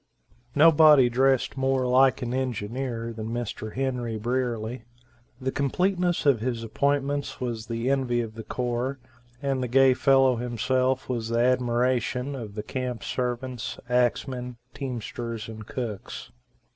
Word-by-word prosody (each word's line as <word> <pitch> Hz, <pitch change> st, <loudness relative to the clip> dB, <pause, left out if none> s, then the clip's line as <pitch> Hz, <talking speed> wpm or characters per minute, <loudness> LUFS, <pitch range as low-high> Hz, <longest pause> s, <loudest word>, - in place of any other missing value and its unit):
Nobody 150 Hz, -4 st, +7 dB
dressed 130 Hz, +2 st, +2 dB
more 135 Hz, -1 st, +1 dB
like 130 Hz, +1 st, +4 dB
an 120 Hz, 0 st, -3 dB
engineer 120 Hz, -1 st, -3 dB
than 110 Hz, -1 st, -6 dB
Mr. 115 Hz, -2 st, -4 dB
Henry 125 Hz, -4 st, -2 dB
Brierly. 120 Hz, 0 st, -2 dB, 0.6 s
The 130 Hz, 0 st, -2 dB
completeness 175 Hz, +5 st, 0 dB
of 140 Hz, -5 st, +4 dB
his 115 Hz, 0 st, -2 dB
appointments 140 Hz, +4 st, -1 dB
was 115 Hz, -3 st, -4 dB
the 115 Hz, +1 st, -3 dB
envy 130 Hz, -3 st, +1 dB
of 115 Hz, -2 st, -6 dB
the 110 Hz, -, -7 dB
corps, 125 Hz, +3 st, -2 dB, 0.5 s
and 135 Hz, -2 st, 0 dB
the 125 Hz, -, -1 dB
gay 135 Hz, +1 st, +5 dB
fellow 135 Hz, -1 st, +4 dB
himself 130 Hz, +2 st, 0 dB
was 115 Hz, -3 st, -2 dB
the 115 Hz, -, 0 dB
admiration 125 Hz, +1 st, +1 dB
of 110 Hz, -6 st, -7 dB
the 105 Hz, -, -4 dB
camp 125 Hz, -3 st, -4 dB
servants, 125 Hz, -1 st, -3 dB
axemen, 125 Hz, 0 st, 0 dB, 0.2 s
teamsters 115 Hz, -3 st, -5 dB
and 110 Hz, -1 st, -9 dB
cooks. 115 Hz, -6 st, -6 dB
125 Hz, 135 wpm, -26 LUFS, 115-135 Hz, 0.6 s, Nobody